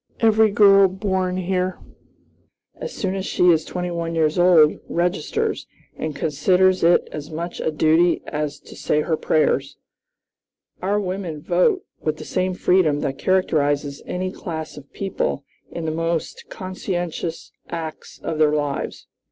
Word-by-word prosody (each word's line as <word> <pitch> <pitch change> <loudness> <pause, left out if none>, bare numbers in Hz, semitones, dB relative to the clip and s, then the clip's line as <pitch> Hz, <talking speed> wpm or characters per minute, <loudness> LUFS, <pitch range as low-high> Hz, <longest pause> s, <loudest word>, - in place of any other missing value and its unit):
Every 220 -1 +5
girl 200 -1 +6
born 190 -1 -1
here, 185 0 -1 1.0
as 485 - -6
soon 190 -2 -2
as 195 -1 -3
she 180 0 +4
is 160 -2 +2
twenty 180 +1 -4
one 165 -1 -3
years 160 +1 +1
old, 170 -4 +5
registers, 175 -2 -1 0.3
and 155 -2 -4
considers 185 +5 +2
it 170 +1 +4
as 150 0 -7
much 170 +2 -5
a - - 0
duty 160 +3 +3
as 150 -1 -3
to - - -13
say 150 - 0
her 160 +1 0
prayers. 140 -3 +1 1.0
Our 200 +3 +1
women 185 -5 -4
vote 180 - +1
with 155 -1 -2
the - - -9
same 185 0 -1
freedom 170 -6 +2
that 135 0 -3
characterizes 145 -6 +1
any 185 +1 -2
class 160 -4 -6
of 140 -1 -13
people 190 -7 -2 0.2
in 170 - -5
the 160 - -1
most 165 0 -3
conscientious 175 -3 -4 0.2
acts 160 -2 -6
of 160 -1 -3
their 150 -1 +4
lives." 145 -2 -3
170 Hz, 145 wpm, -22 LUFS, 155-185 Hz, 1.0 s, girl